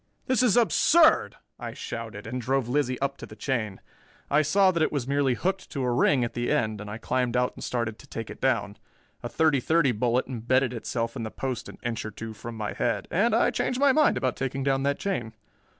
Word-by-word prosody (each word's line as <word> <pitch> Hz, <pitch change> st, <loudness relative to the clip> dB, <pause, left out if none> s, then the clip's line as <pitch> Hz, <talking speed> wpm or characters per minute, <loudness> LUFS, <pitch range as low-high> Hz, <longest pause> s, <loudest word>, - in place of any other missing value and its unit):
"This 255 Hz, -1 st, +2 dB
is 245 Hz, -3 st, +4 dB
absurd," 315 Hz, +7 st, +4 dB, 0.2 s
I -, -, -6 dB
shouted, 115 Hz, -3 st, -6 dB
and 125 Hz, +3 st, -4 dB
drove 130 Hz, +1 st, 0 dB
Lizzie 130 Hz, -1 st, 0 dB
up 140 Hz, 0 st, -1 dB
to -, -, -9 dB
the -, -, -12 dB
chain. 110 Hz, -8 st, -2 dB, 0.5 s
I 150 Hz, +2 st, +5 dB
saw 190 Hz, +6 st, +4 dB
that 170 Hz, -2 st, -1 dB
it 155 Hz, -, +2 dB
was 140 Hz, -4 st, -2 dB
merely 140 Hz, -2 st, +2 dB
hooked 190 Hz, +6 st, -2 dB
to 135 Hz, -, -2 dB
a 125 Hz, -, +1 dB
ring 125 Hz, +1 st, +3 dB
at 115 Hz, -, -3 dB
the 120 Hz, 0 st, -2 dB
end, 110 Hz, -2 st, 0 dB
and 105 Hz, -, -7 dB
I 105 Hz, -, -5 dB
climbed 125 Hz, +1 st, -1 dB
out 125 Hz, 0 st, +1 dB
and -, -, -10 dB
started 115 Hz, -3 st, -2 dB
to -, -, -15 dB
take 115 Hz, -1 st, -6 dB
it -, -, -11 dB
down. 115 Hz, -6 st, 0 dB, 0.4 s
A -, -, -5 dB
thirty 155 Hz, -4 st, +2 dB
thirty 160 Hz, +1 st, +2 dB
bullet 120 Hz, +2 st, +1 dB
embedded 130 Hz, +1 st, 0 dB
itself 115 Hz, 0 st, -3 dB
in 125 Hz, -, -4 dB
the 110 Hz, -, -3 dB
post 130 Hz, -1 st, -4 dB
an -, -, -11 dB
inch 120 Hz, -1 st, -2 dB
or 110 Hz, -, -5 dB
two 110 Hz, +1 st, -7 dB
from 115 Hz, +2 st, -8 dB
my 105 Hz, -1 st, -3 dB
head, -, -, -1 dB
and 220 Hz, +6 st, +2 dB
I 230 Hz, -, +3 dB
changed 255 Hz, -, -1 dB
my 280 Hz, 0 st, +5 dB
mind 305 Hz, +2 st, +3 dB
about 130 Hz, -2 st, 0 dB
taking 135 Hz, 0 st, -3 dB
down 135 Hz, 0 st, +1 dB
that 140 Hz, +1 st, 0 dB
chain. 120 Hz, -, -3 dB
130 Hz, 230 wpm, -26 LUFS, 115-145 Hz, 0.5 s, I